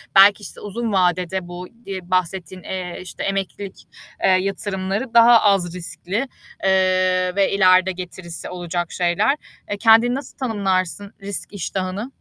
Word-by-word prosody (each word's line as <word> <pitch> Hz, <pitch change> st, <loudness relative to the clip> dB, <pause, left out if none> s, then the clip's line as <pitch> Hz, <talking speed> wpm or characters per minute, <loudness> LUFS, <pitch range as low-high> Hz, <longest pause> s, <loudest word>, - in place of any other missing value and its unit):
belki, 200 Hz, +2 st, +7 dB
işte, -, -, -8 dB
uzun 220 Hz, +2 st, -3 dB
vadede 180 Hz, 0 st, +1 dB
bu, 175 Hz, +1 st, -8 dB, 0.2 s
iii, 185 Hz, -3 st, -6 dB
bahsettiğin, 185 Hz, 0 st, -1 dB
eee, 180 Hz, -2 st, -5 dB
işte 185 Hz, -, -7 dB
emeklilik, 195 Hz, 0 st, -4 dB, 0.4 s
eee, -, -, +5 dB
yatırımları 195 Hz, +4 st, -1 dB
daha 235 Hz, 0 st, +7 dB
az 195 Hz, -4 st, +2 dB
riskli, 190 Hz, +7 st, -3 dB, 0.4 s
eee, 185 Hz, -1 st, +2 dB
ve 200 Hz, -1 st, +2 dB
ileride 185 Hz, -1 st, +4 dB
getirisi 180 Hz, -1 st, -7 dB
olacak 175 Hz, -1 st, -4 dB
şeyler. 175 Hz, +10 st, +1 dB, 0.3 s
E, 205 Hz, -, -3 dB
kendini 230 Hz, +3 st, +5 dB
nasıl 275 Hz, -1 st, -8 dB
tanımlarsın 200 Hz, -5 st, -1 dB
risk 200 Hz, +1 st, -3 dB
iştahını? 190 Hz, +2 st, -3 dB
190 Hz, 135 wpm, -21 LUFS, 180-205 Hz, 0.4 s, belki